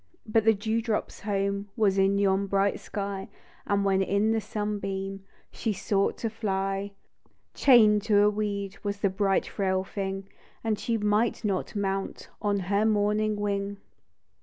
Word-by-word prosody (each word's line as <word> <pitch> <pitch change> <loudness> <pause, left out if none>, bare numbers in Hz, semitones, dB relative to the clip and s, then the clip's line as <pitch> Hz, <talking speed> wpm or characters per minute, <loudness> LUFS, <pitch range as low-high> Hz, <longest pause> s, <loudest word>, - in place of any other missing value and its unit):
But 220 0 +2
the 225 -1 +5
dew 220 +3 -1
drop's 220 -2 -2
home 200 0 -2
Was 200 -3 +3
in 195 +1 +3
yon 200 0 +2
bright 195 +1 +1
sky, 200 -1 -5 0.4
And 200 0 +1
when 195 -1 +3
in 200 +3 +2
the 225 0 +1
sunbeam 195 -2 -4 0.3
She 225 -2 -2
sought 195 +1 0
to 225 - -2
fly, 195 -2 -2 0.6
Chain'd 215 -6 +6
to 205 -2 +4
a 210 - +5
weed 200 -2 -2
W 205 - -2
as 200 0 -5
the 200 - +2
bright 195 0 +1
frail 190 -2 -1
thing, 195 0 -4 0.4
And 220 -2 0
she 230 -1 0
might 210 +2 +1
not 195 -1 -2
mount 195 -1 -3
On 205 -2 +1
her 200 +3 +1
morning 215 0 +2
wing. 200 -1 -2
200 Hz, 160 wpm, -27 LUFS, 195-210 Hz, 0.6 s, Chain'd